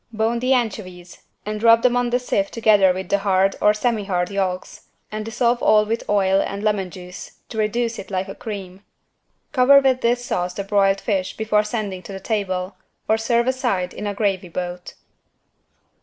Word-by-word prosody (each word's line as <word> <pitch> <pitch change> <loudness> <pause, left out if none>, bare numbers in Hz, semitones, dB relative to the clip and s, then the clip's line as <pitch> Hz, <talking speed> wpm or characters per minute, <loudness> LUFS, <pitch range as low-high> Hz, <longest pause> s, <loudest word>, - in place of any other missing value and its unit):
Bone 225 +1 0
the 255 +2 0
anchovies 185 -7 -4 0.2
and 210 0 -4
rub 230 0 +5
them 250 -1 +3
on 245 0 +1
the 245 - +2
sieve 200 -5 -1
together 210 -4 +4
with 185 0 -5
the 200 - +2
hard 195 -1 +2
(or 210 - +6
semi 215 -1 -1
hard) 180 -1 -1
yolks, 190 -2 -3 0.2
and 215 0 -4
dissolve 235 +2 0
all 215 0 +4
with 225 +2 -3
oil 195 -1 +3
and 200 +1 -4
lemon 205 -3 0
juice 180 +1 -10 0.2
to 220 - -5
reduce 230 +2 -1
it - - -9
like 190 0 -2
a 195 - -6
cream. 195 -3 -8 0.7
Cover 280 +1 +6
with 265 -2 +1
this 240 +1 +1
sauce 180 -4 -2
the 200 - -3
broiled 195 -1 +2
fish 190 -4 -2
before 215 -1 +2
sending 210 -4 -4
to 195 - -10
the 195 - -6
table, 190 -3 -3 0.3
or 220 - +3
serve 235 +1 +1
aside 245 -9 -1
in 210 - -5
a 205 - -3
gravy 195 -4 -1
boat. 180 +1 -6
210 Hz, 185 wpm, -21 LUFS, 190-230 Hz, 0.7 s, or